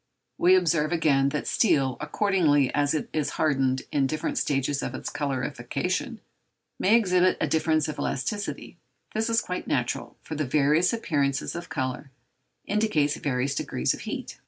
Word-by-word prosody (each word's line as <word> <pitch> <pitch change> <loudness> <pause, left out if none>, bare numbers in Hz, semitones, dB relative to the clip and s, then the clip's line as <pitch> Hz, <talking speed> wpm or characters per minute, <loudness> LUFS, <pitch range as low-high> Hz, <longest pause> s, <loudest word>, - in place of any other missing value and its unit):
We 180 +2 +6
observe, 165 -4 +2
again, 145 -5 +3
that 150 +1 -3
steel, 140 - +2
accordingly 150 -4 +2
as 145 +1 +1
it 155 - -2
is 155 -2 0
hardened 135 -3 +1
in 140 -2 +2
different 155 +2 -2
stages 140 0 0
of - - -4
its - - -5
colorification, 145 - -3 0.6
may 210 +4 +4
exhibit 185 -5 +3
a - - +1
difference 160 -1 +1
of 155 - -5
elasticity: 205 - -3 0.3
this 220 +1 0
is 230 0 +3
quite 180 - -5
natural, 125 -1 -2
for - - -7
the 155 0 -1
various 150 +5 +3
appearances 140 -12 -1
of 170 0 -7
colour 135 -2 -3 0.6
indicate 200 -9 +1
various 135 -1 -1
degrees 65 - -1
of - - -8
heat. - - -6
150 Hz, 155 wpm, -26 LUFS, 140-180 Hz, 0.6 s, We